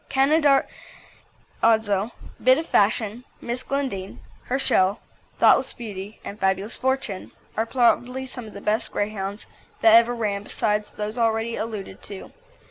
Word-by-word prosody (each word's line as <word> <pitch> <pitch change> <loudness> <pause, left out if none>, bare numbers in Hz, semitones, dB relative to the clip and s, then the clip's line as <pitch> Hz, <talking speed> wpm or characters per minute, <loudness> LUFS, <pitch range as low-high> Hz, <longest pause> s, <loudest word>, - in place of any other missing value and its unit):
Canaradzo, 265 -7 0 0.3
Bit 255 +1 +6
of 320 - -2
Fashion, 220 -1 +1 0.2
Miss 240 +1 -3
Glendine, 255 -9 -3 0.3
Herschel, 235 -6 +2 0.4
Thoughtless - - +5
Beauty, 205 -2 -8
and 205 - -7
Fabulous 190 +3 0
Fortune, 260 -6 -2 0.2
are 225 +1 0
probably 250 +1 +2
some 250 -3 -7
of 210 - -12
the 200 - -8
best 215 +2 0
Greyhounds 205 0 -3 0.4
that 225 -1 +7
ever 235 +1 +6
ran 205 -3 -1
besides 210 0 -1
those 215 +3 -4
already 225 0 +1
alluded 215 -4 -5
to. 200 -2 -9
225 Hz, 125 wpm, -24 LUFS, 205-250 Hz, 0.4 s, that